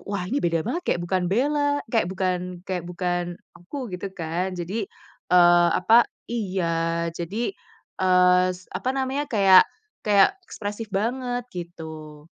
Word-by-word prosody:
"wah 200 -3 -2
ini 255 +10 -1
beda 165 -2 0
banget, 260 +10 -2
kayak - - +1
bukan 185 +1 0
Bella" 290 +6 +1
kayak 225 -6 +2
bukan 180 -1 -3
kayak 180 -2 -3
bukan 175 -1 -2 0.2
aku, 240 +3 -7
gitu 180 +2 -4
kan. 175 +3 -3
Jadi, 190 +4 -3 0.4
eee, 175 -1 +6
apa 225 +6 +5 0.2
iya, 195 -6 -1 0.5
jadi, 195 - -3 0.5
eee, 180 0 +5
s 185 - -16
apa 255 - -3
namanya, 270 +2 -1
kayak 195 -4 +6 0.3
kayak 200 -2 +4 0.2
ekspresif 210 +1 -5
banget, 245 +4 -2
gitu. 160 -3 -8
185 Hz, 135 wpm, -24 LUFS, 175-225 Hz, 0.5 s, eee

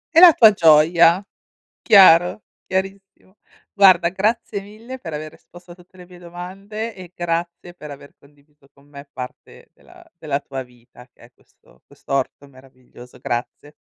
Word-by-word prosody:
E - - +7
la 355 -1 +9
tua 220 -6 +6
gioia. 170 +1 +3 0.6
Chiaro, 180 -1 +5 0.2
chiarissimo. 195 0 -6 0.4
Guarda, 185 -4 +4
grazie 205 +2 -3
mille 220 +6 -12
per 180 -10 -10
aver 155 +1 -7
risposto 175 0 -18
a - - -13
tutte 185 +1 -22
le 180 - -14
mie 180 -1 -16
domande 195 +6 -9
e 180 -2 -13
grazie 175 0 -5
per 150 -4 -12
aver 140 0 -14
condiviso 145 0 -27
con 140 0 -25
me 140 0 -14
parte 125 -2 -11
della 355 0 -20 0.2
della 145 -3 -4
tua 135 -2 -8
vita, 125 0 -20
che - - -43
è 120 - -19
questo - - -29
quest'orto 135 +1 -5
meraviglioso. 130 -2 -18
Grazie. 125 +5 -6
170 Hz, 150 wpm, -19 LUFS, 140-195 Hz, 0.6 s, la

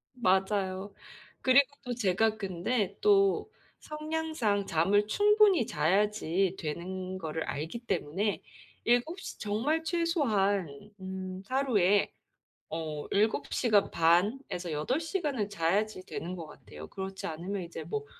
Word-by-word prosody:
맞아요. 190 -2 0 0.5
그리고 260 +1 +6 0.2
또 250 -1 -3
제가 220 0 +1
근데 200 +2 -1
또 400 +1 +3 0.3
성향상 305 -10 -2
잠을 200 +6 +2
충분히 415 - +4
자야지 190 0 +1
되는 185 +4 -4
거를 160 -2 -3
알기 160 +11 -4
때문에 205 -2 -1 0.4
7 245 +10 +2
시 - - -8
정말 255 +11 0
최소한 210 - 0
음 190 0 -6
하루에 210 -8 +2 0.6
어 155 -2 -4
7 215 +2 +1
시간 210 -5 +3
반에서 175 - +1
8 155 - 0
시간을 300 - -2
자야지 195 +2 0
되는 180 +2 -5
것 165 -3 -7
같아요. 80 - -11
그렇지 190 0 -6
않으면 180 +5 -4
이제 165 -1 -7
뭐 145 -3 -4
200 Hz, 230 characters per minute, -30 LUFS, 180-250 Hz, 0.6 s, 그리고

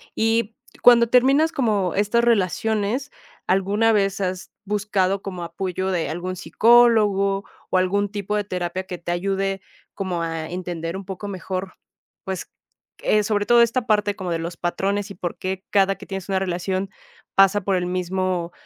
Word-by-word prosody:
Y, 225 0 +1 0.3
¿cuándo 235 -1 +7
terminas 270 +6 +4
como 210 - 0
estas 210 +4 +2
relaciones, 220 +4 0 0.4
alguna 200 +4 +2
vez 195 -2 +1
has 185 -1 -3
buscado 200 -2 0
como 185 -3 -5
apoyo 185 +2 -3
de 175 -6 -1
algún 175 +3 -4
psicólogo 205 -2 +4 0.3
o - - +3
algún 200 +2 +1
tipo 205 0 -3
de 210 - 0
terapia 180 -1 -3
que 180 -1 -6
te 175 - -4
ayude 195 +2 -1 0.3
como 185 -3 -2
a 165 -1 -3
entender 175 -2 -4
un 195 0 -7
poco 190 +1 -6
mejor, 185 -1 -5 0.5
pues, 190 -1 -5 0.5
eh, 210 0 +2
sobre 205 -1 0
todo 240 0 +6
esta 235 +1 0
parte 210 -1 +2
como 185 -3 -5
de 165 - -1
los 170 +1 -5
patrones 195 +4 -1
y 200 - -9
por 175 -1 -5
qué 190 0 -4
cada 195 -1 +3
que - - -11
tienes 195 -1 -6
una 190 - +1
relación, 190 +1 -2 0.5
pasa 195 +1 +5
por 195 +1 0
el 180 - -1
mismo, 180 -1 -2
195 Hz, 165 wpm, -22 LUFS, 185-210 Hz, 0.5 s, cuándo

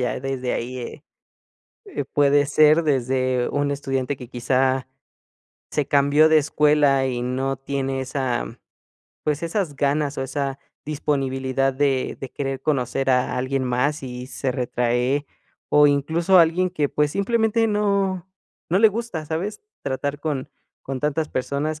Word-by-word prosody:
ya 125 0 -1
desde 130 -1 -2
ahí, 125 +2 -4
eh 125 +5 -8 0.8
eh, 380 - -4
puede 145 +1 +3
ser 155 +3 +5
desde 130 -3 +1
un 145 0 0
estudiante 135 -1 -2
que 125 - -9
quizá, 130 +1 +1 0.9
se 150 -3 0
cambió 145 +2 +4
de 160 0 +6
escuela 150 -2 +3
y 120 -1 -2
no 130 +2 -1
tiene 135 0 -3
esa, 130 -3 -2 0.7
pues, 150 0 -1
esas 170 -3 -2
ganas 145 +1 0
o - - -1
esa 135 0 -3 0.3
disponibilidad 135 -2 0
de 135 -2 0
de 135 - -6
querer 135 -1 -3
conocer 135 -2 0
a 125 -1 +1
alguien 130 +1 -1
más 135 +4 0
y 125 0 -7
se 135 -1 -2
retrae, 125 +2 0 0.4
o 150 0 +6
incluso 160 +6 +3
alguien 175 +2 +3
que, 150 -5 0
pues, 150 +1 +1
simplemente, 225 +3 +1
no 200 -3 0 0.4
no 180 - +2
le 220 - +7
gusta, 215 -7 -3
¿sabes?, 180 +7 -3 0.2
tratar 140 +1 -3
con 145 -4 -3 0.3
con 135 -1 -5
tantas 150 +2 0
personas 145 +4 -2
140 Hz, 145 wpm, -23 LUFS, 130-155 Hz, 0.9 s, le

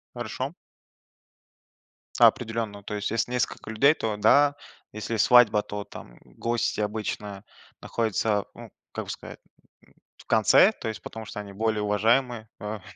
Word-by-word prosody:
Хорошо. 125 +4 -4 1.7
Определенно, 110 -3 +2
то 105 - -5
есть 105 +1 -3
если 115 +2 -1
несколько 125 -3 -2
людей, 140 +8 +4
то 110 -7 -3
да, 140 +7 +4 0.4
если 110 +2 -4
свадьба, 110 -2 +6
то, 105 0 -6
там, - - -12
гости 115 -2 -2
обычно 105 -1 -4 0.4
находятся, 110 -2 -1
м, - - -11 0.2
как - - -5
бы - - -12
сказать, - - -9 0.5
м, - - -26 0.2
в - - -17
конце, 110 - +5
то 165 - -8
есть 110 - -5
потому 110 0 -8
что 105 - -7
они 100 -1 -8
более 110 +1 -1
уважаемые, 110 +2 +1
а, 105 -1 -5
110 Hz, 145 wpm, -26 LUFS, 105-120 Hz, 1.7 s, свадьба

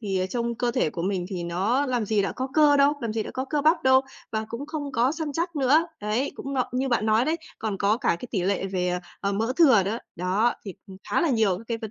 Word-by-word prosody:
Thì 190 -4 -1
trông 235 -1 -1
cơ 245 +1 0
thể 155 - 0
của 170 - -5
mình 185 -2 -1
thì 180 -3 -4
nó 200 +12 0
làm 245 -4 0
gì 210 -1 +2
đã 195 - -2
có 260 +1 -4
cơ 295 -2 +6
đâu, 280 +1 +5
làm 230 -3 -2
gì 220 -1 -1
đã - - -7
có 260 - -3
cơ 295 +2 -1
bắp 315 +3 +3
đâu, 260 0 +6 0.3
và 220 0 -1
cũng 250 +6 -6
không 290 -3 -5
có 250 +3 +2
săn 315 -3 -4
chắc 335 +2 -2
nữa, 290 +5 +4
đấy, 215 +7 -1
cũng 275 0 -5
mập 255 - +1
như 265 +1 0
bạn 235 -3 +1
nói 220 +3 +3
đấy, 320 +2 0 0.2
còn 215 -3 -3
có 205 +3 +2
cả 255 - -2
cái 250 - -7
tỉ 190 -6 -1
lệ 195 0 0
về, 185 -2 -1
ờ, 180 0 -1 0.2
ờ, 200 0 -1
mỡ 225 +5 0
thừa 265 - +6
đó. 210 +5 -2 0.2
Đó, 190 +7 +1
thì 195 -4 -7 0.4
khá - - +2
là 335 - +2
nhiều 215 -6 +2
các 225 - -12
cái 230 -1 -2
vấn 220 -2 -6
230 Hz, 275 wpm, -25 LUFS, 200-270 Hz, 0.4 s, cơ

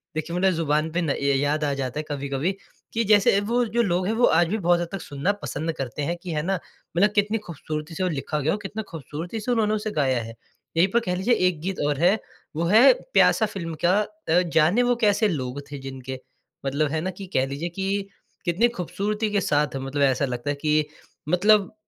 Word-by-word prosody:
देखिए 170 +2 -3
मतलब 190 +1 +3
ज़ुबान 155 -1 0
पे 175 +2 0
ना 155 -4 0
य 140 0 +1
याद 150 +2 0
आ 145 -1 +1
जाता 135 +1 -3
है - - -2
कभी-कभी 140 +4 -1 0.4
कि 230 0 +1
जैसे 200 -1 +5
वो 235 +4 +1
जो 235 +2 0
लोग 180 -3 +1
हैं 220 - +1
वो 240 +2 +4
आज 175 -1 +4
भी 215 +5 -1
बहुत 175 -2 +3
हद 170 - -2
तक 195 - -5
सुनना 145 +8 -1
पसंद 160 +3 -3
करते 135 +2 -4
हैं 170 +4 -1
कि 175 - -5
है 150 -1 0
ना, 190 -1 0 0.4
मतलब 205 +4 +5
कितनी 210 +2 +2
खूबसूरती 155 -3 -6
से 185 - -2
वो 180 - +1
लिखा 150 0 -2
गया 150 +3 +1
हो, 210 - 0
कितना 210 +2 -5
खूबसूरती 165 - -6
से 245 +4 -2
उन्होंने 215 -2 +2
उसे 215 0 -2
गाया 130 - +1
है। 115 +1 -8 0.4
यहीं 180 +3 +5
पर 235 - +5
कह 180 - 0
लीजिए 210 +7 +2
एक 170 -4 -1
गीत 190 +2 -3
और 145 -2 0
है 185 +6 +4 0.4
वो 165 - -1
है 220 +9 +7 0.2
प्यासा 220 - +5
फ़िल्म 165 -6 -5
का, 190 +4 +4 0.3
अ 175 +2 +5
जाने 175 +10 +4
वो 245 0 +2
कैसे 210 +1 +3
लोग 140 -5 -3
थे 145 - -5
जिनके, 130 -1 -7 0.5
मतलब 140 +2 0
है 160 -1 -1
ना 185 - -2
कि - - -5
कह 130 - +3
लीजिए 145 +6 -4
कि 195 +1 -2 0.4
कितनी 180 +8 +3
खूबसूरती 210 +5 -2
के 205 -1 +1
साथ 150 -3 +1
मतलब 135 +2 -3
ऐसा 135 +1 +3
लगता 125 +2 -4
है 145 - 0
कि 155 -1 +2 0.4
मतलब 205 +3 +4
170 Hz, 225 wpm, -24 LUFS, 145-200 Hz, 0.5 s, है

